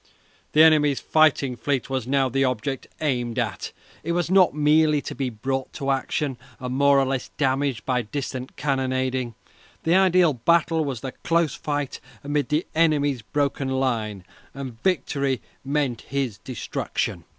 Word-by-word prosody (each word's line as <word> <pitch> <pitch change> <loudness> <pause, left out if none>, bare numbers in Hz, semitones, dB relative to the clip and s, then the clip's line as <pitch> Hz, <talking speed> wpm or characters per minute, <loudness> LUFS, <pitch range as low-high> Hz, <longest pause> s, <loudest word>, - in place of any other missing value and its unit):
The 155 - +7
enemy's 150 -3 +5
fighting 145 -5 +3
fleet 130 +2 -1
was 130 -3 -3
now 135 0 +2
the 135 +2 +1
object 130 +1 -2
aimed 120 -6 -1
at. - - -2 0.3
It 170 - -1
was 175 0 0
not 190 -5 +5
merely 150 0 +4
to - - -5
be 135 -2 -2
brought 130 +4 -3
to 140 -2 -1
action, 135 0 -1 0.2
and 125 0 -4
more 140 +1 +4
or 135 - +3
less 130 -1 -2
damaged 135 -3 0
by 125 -2 +1
distant 130 +2 -5
cannonading. 130 -3 -1 0.5
The 165 - +2
ideal 185 -3 +5
battle 160 +5 +2
was 135 -6 -4
the 135 - -4
close 165 -4 +2
fight 145 -2 -3 0.2
amid 145 -2 -1
the 150 +3 +1
enemy's 145 -5 +2
broken 140 +3 -1
line, 115 -7 -1 0.3
and 130 -4 -7
victory 140 -8 0 0.2
meant 135 -4 -1
his 130 -7 -3
destruction. 125 0 -3
135 Hz, 150 wpm, -24 LUFS, 130-150 Hz, 0.5 s, The